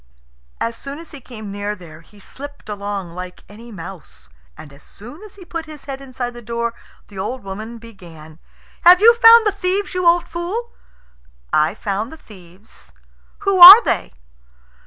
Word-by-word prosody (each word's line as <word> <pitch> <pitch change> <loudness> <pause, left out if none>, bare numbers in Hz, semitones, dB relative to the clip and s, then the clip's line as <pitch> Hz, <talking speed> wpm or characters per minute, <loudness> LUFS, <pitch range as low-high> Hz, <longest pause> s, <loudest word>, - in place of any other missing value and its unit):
As 230 0 -3
soon 275 +4 -9
as 330 0 -13
he 285 -4 -11
came 220 -5 -10
near 205 +1 -5
there 165 -4 -15
he 205 +5 -22
slipped 285 +4 -12
along 200 -4 -6
like 180 0 -10
any 230 +3 -14
mouse. 185 - -12 0.3
And 145 -3 -13
as 140 - -18
soon 245 - -13
as 425 -2 -14
he 380 -3 -14
put 330 -2 -7
his 305 -2 -12
head 270 -1 -7
inside 255 -2 -6
the 240 - -11
door 235 +1 -4 0.4
the 200 -2 -11
old 245 +6 -5
woman 215 +4 -8
began, 170 -9 -15 0.4
"Have 355 +1 +7
you 460 +3 +6
found 460 -1 +6
the 420 - +2
thieves, 390 0 -2
you 365 -1 -1
old 345 0 +2
fool?" 390 +8 -6 0.8
"I 155 +5 +1
found 210 +3 -4
the 320 - -12
thieves." 190 - -15 0.5
"Who 395 -2 0
were 385 +7 +12
they?" - - -2
235 Hz, 175 wpm, -18 LUFS, -, 0.8 s, were